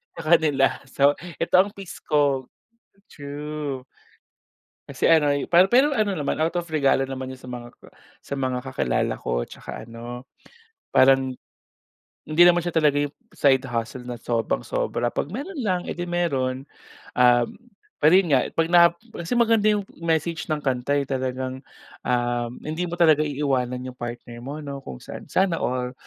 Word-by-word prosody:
sa - - -6
kanila 145 -5 +3
so, 140 +2 +4 0.2
eto 165 - 0
ang 195 - +5
piece 195 -3 -9
ko. 140 -3 +1 0.6
True. 145 -2 -6 1.1
Kasi - - +1
ano 150 -3 +5 0.2
pa 175 +2 +7
pero 260 +6 +3
ano 210 -2 +1
naman 150 -6 -2
out 160 +2 0
of 170 - -14
regalo 140 -3 +2
naman 130 0 -5
'yun 130 - -13
sa 125 - -10
mga 120 -1 -8 0.5
sa 140 - -5
mga 130 -2 -1
kakilala 65 - -1
ko - - -2
tsaka - - -8
ano 120 +3 -9 0.6
parang, 135 0 +5 1.0
hindi 155 +3 +1
naman 175 0 +5
siya 175 0 -4
talaga 150 -3 +3
'yung 145 0 -3 0.2
side 135 -2 +3
hustle 120 0 -4
na 120 -1 -5
sobrang 115 - -1
sobra 120 0 -1
'pag - - -2
meron 300 - -5
lang 185 -3 +1
eh, - - -5
'di 175 - -3
meron. 135 -7 -1 0.4
Um, 120 -1 +4 0.5
pero 155 +3 +5
'yun 190 -3 +3
nga, 130 -2 +3
'pag 165 0 +2
na 170 -1 +8 0.3
kasi 170 +9 -2
maganda 225 -2 +4
'yung 205 -2 +2 0.2
message 165 0 -1
ng 150 -1 -2
kanta 130 +1 0
eh, 140 - +1
talagang, 130 -1 -3 0.4
um, 120 -1 0
hindi 165 +3 -3
mo 175 - -4
talaga 155 -3 +5
iiwanan 135 -4 -1
'yung 130 -1 -8
partner 120 0 -7
mo 140 +5 -6
'no 140 -1 -6
kung 65 - -8
saan. - - -10
Sana 185 -3 +1
all 125 0 -2
140 Hz, 165 wpm, -24 LUFS, 125-165 Hz, 1.1 s, na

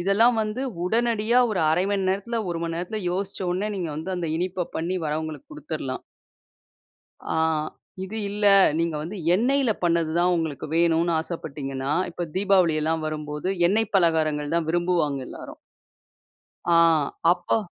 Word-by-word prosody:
இதெல்லாம் 220 +6 +3
வந்து 215 +4 -2 0.2
உடனடியா 230 +3 +2
ஒரு 195 -5 0
1/2 160 +4 +2
மணி 195 -2 0
நேரத்துல, 220 +4 -1
1 170 -1 -3
மணி 165 0 -3
நேரத்துல 180 +5 -3
யோசிச்ச 195 +2 -3
உடனே 190 +4 -1
நீங்க 175 -4 -3
வந்து 185 +4 -4
அந்த 170 -2 -2
இனிப்ப 180 0 -2
பண்ணி 175 +3 -1
வரவங்களுக்கு 155 -1 -4
கொடுத்துர்லாம். 150 -3 -5 1.3
ஆ - - 0 0.7
இது 210 +4 -7
இல்ல. 205 0 +1 0.3
நீங்க 165 -1 0
வந்து 185 +6 -6 0.2
எண்ணெயில 255 +3 +2
பண்ணது 165 -2 +2
தான் 180 +1 +3
உங்களுக்கு 160 -4 -3
வேணுன்னு 170 0 +3
ஆசைப்பட்டீங்கன்னா, 140 -4 -4 0.2
இப்ப 175 0 -4
தீபாவளி 190 -4 +3
எல்லாம் 160 0 0
வரும்போது 150 +2 -4 0.2
எண்ணெய் 215 +2 +1
பலகாரங்கள் 155 -4 +1
தான் 165 -2 0
விரும்புவாங்க 170 -5 0
எல்லாரும். - - -9 1.2
ஆ - - +6 0.6
அப்போ 180 +4 0
175 Hz, 140 wpm, -24 LUFS, 160-200 Hz, 1.3 s, ஆ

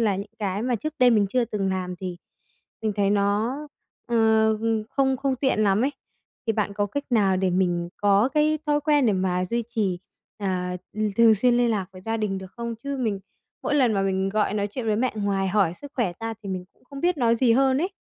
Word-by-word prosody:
là 210 -4 +2
những 200 +2 -6
cái 200 0 -2
mà 245 0 0
trước 310 +7 -5
đây 250 -1 +6
mình 210 -3 +3
chưa 250 +1 +2
từng 210 -4 -2
làm 180 -1 -3
thì 180 -1 -5 0.7
mình 215 -1 0
thấy 200 -1 +2
nó, 205 +5 +1 0.5
ờ, 220 -2 +3 0.3
không 265 -1 +1
không 270 0 -1
tiện 260 -4 +1
lắm 200 +1 +3
ấy. 285 - 0 0.5
Thì 225 - +2
bạn 210 -2 -1
có 205 0 0
cách 285 +8 -4
nào 200 -5 +3
để 185 0 +1
mình 175 -1 0
có 205 +4 +3
cái 305 +1 +3
thói 295 0 +2
quen 290 -3 +3
để 215 - +3
mà 185 -1 0
duy 235 +5 -2
trì, 205 -6 -1 0.4
ờ, 180 -2 -2 0.2
ừm, 215 -1 -1
thường 230 -1 +7
xuyên 240 +3 +3
liên 240 -1 +3
lạc 200 -4 -1
với 185 - -12
gia 225 0 -1
đình 205 -3 -2
được 190 0 -10
không? 235 -1 -4
Chứ 280 0 -2
mình 220 -7 -1 0.4
mỗi 295 - 0
lần 255 -6 +3
mà 195 - +1
mình 190 0 0
gọi 210 0 0
nói 205 -1 0
chuyện 230 +3 -5
với 215 -1 +2
mẹ 250 +3 0
ngoài 200 -2 0
hỏi 190 -3 +2
sức 285 0 -9
khỏe 230 -10 0
ra 225 0 -3
thì 200 - -7
mình 185 -1 -4
cũng - - -32
không 275 +1 -9
biết 350 +2 +2
nói 235 -2 +3
gì 235 -1 +3
hơn 265 +2 +3
ấy. 355 +5 0
215 Hz, 235 wpm, -24 LUFS, 195-245 Hz, 0.7 s, thường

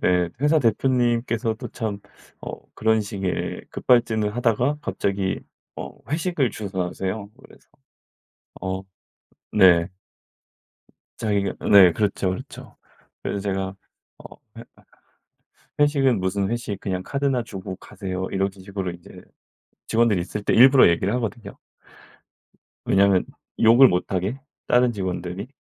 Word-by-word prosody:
네 90 -1 +2
회사 150 +2 +4
대표님께서도 120 -2 0
참 105 -3 -4 0.4
어 - - -6 0.2
그런 110 0 +2
식의 100 -3 -4
급발진을 110 -4 +2
하다가 125 +4 +1
갑자기 100 -8 -2 0.4
어 - - -6 0.2
회식을 155 -5 0
주선하세요. 95 0 -4
그래서 - - -19 0.9
어 95 0 -3 0.7
네. 85 -2 +5 1.3
자기가 100 -3 -1 0.2
네 95 -3 +9
그렇죠 100 -2 0
그렇죠. 95 - -8 0.5
그래서 100 - -2
제가 95 -1 -3 0.4
어 - - -12 0.2
회 - - -9 1.1
회식은 140 -6 +3
무슨 95 +1 -1
회식, 110 -4 -3
그냥 95 -2 -3
카드나 135 0 -1
주고 95 -4 -7
가세요. 95 0 -6
이런 95 0 0
식으로 95 -1 -5
인제 85 0 -13 0.7
직원들이 115 -4 +2
있을 100 +4 -5
때 - - +1
일부러 130 0 +7
얘기를 90 +5 0
하거든요. 115 -1 -5 1.3
왜냐하면 100 -1 +3 0.4
욕을 120 +4 +8
못 90 -3 -1
하게 95 +8 -2 0.3
다른 125 0 +4
직원들이. 90 +1 -4
100 Hz, 260 characters per minute, -23 LUFS, 95-120 Hz, 1.3 s, 네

